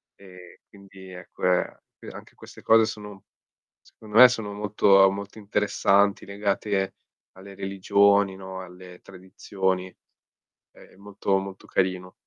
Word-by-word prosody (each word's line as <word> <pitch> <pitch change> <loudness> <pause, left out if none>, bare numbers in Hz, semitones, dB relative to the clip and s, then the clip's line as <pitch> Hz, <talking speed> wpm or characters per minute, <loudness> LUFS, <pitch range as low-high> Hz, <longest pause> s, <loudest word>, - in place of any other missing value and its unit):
E, 90 -2 -16
quindi, 95 -1 -15
è 90 -1 -12
que 90 -1 -1 0.2
e - - -13
anche - - -13
queste - - -15
cose 115 0 +5
sono 105 -2 -9 0.6
secondo 110 0 -8
me, 125 +1 +11
sono 110 -4 -5
molto 100 -1 +3
ehm, 95 - +2
molto 100 +2 -9
interessanti, 100 -1 +1
legate 100 -1 -2 0.4
alle 95 +1 -13
religioni, 100 0 +1
no, 95 -1 -9
alle 90 0 -13
tradizioni. 95 0 -5 0.8
È - - -19
molto, 100 0 -3
molto 95 0 -9
carino. 90 -1 -2
95 Hz, 125 wpm, -24 LUFS, 95-100 Hz, 0.8 s, me